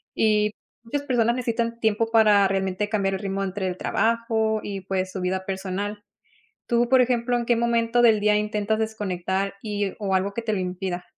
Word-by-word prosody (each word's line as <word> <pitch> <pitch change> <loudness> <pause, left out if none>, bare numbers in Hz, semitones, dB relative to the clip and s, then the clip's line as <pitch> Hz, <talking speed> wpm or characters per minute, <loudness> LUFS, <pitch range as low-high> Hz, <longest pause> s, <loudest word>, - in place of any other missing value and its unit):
Y 210 -1 +2 0.3
muchas 285 +5 -3
personas 235 -3 +1
necesitan 235 -1 -2
tiempo 220 +1 +1
para 210 -3 +5
realmente 195 +1 -1
cambiar 195 -3 0
el - - -4
ritmo 195 0 -2
entre 190 0 -3
el 180 - -2
trabajo 220 +1 0
y 195 -2 -5
pues 185 0 -2
su 190 - -5
vida 185 +1 -2
personal. 195 +2 -4 0.7
Tú, 240 0 +2
por 260 0 +5
ejemplo, 245 0 +1
¿en 240 - -1
qué 240 - +3
momento 235 0 +1
del 225 -3 +5
día 210 0 +3
intentas 210 0 -1
desconectar, 195 -3 -2
y 205 -2 -2
o 195 -2 -1
algo 190 +2 +1
que 235 - -3
te 220 -2 -1
lo 200 - -1
impida? 180 0 -4
210 Hz, 190 wpm, -24 LUFS, 195-230 Hz, 0.7 s, para